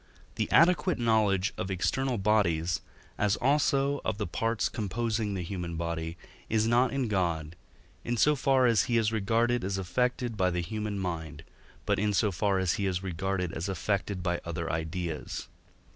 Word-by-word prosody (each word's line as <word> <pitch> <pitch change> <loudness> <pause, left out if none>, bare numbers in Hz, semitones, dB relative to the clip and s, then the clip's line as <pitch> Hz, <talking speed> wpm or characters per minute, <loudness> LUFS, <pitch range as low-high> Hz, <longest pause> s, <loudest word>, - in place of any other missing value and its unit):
the - - -2
adequate 170 +1 +4
knowledge 110 -5 +2
of 95 - -2
external 125 +7 0
bodies, 90 -5 +1 0.4
as 105 -1 +3
also 140 +1 +2
of 110 - -1
the 105 - -2
parts 115 +6 0
composing 110 0 -2
the 90 - -3
human 85 -2 -4
body, 85 0 -3 0.3
is 110 0 +2
not 120 +3 +3
in 135 -3 -1
God, 85 -6 -1 0.5
in 120 0 -1
so 150 +5 +4
far 135 -1 +3
as 115 -5 +4
he 120 - +1
is 110 -1 +2
regarded 115 +3 +1
as 95 +1 -1
affected 120 +6 -1
by 95 -3 +2
the 90 0 -1
human 105 +3 -3
mind, 80 -4 -4 0.4
but - - +1
in 105 0 +1
so 105 0 +2
far 95 +2 +1
as 95 -1 +1
he 100 - 0
is 90 0 -2
regarded 95 -1 -2
as 85 +4 -3
affected 95 0 -2
by 85 -1 -1
other 85 -1 -3
ideas. 80 0 -4
100 Hz, 170 wpm, -29 LUFS, 90-115 Hz, 0.5 s, adequate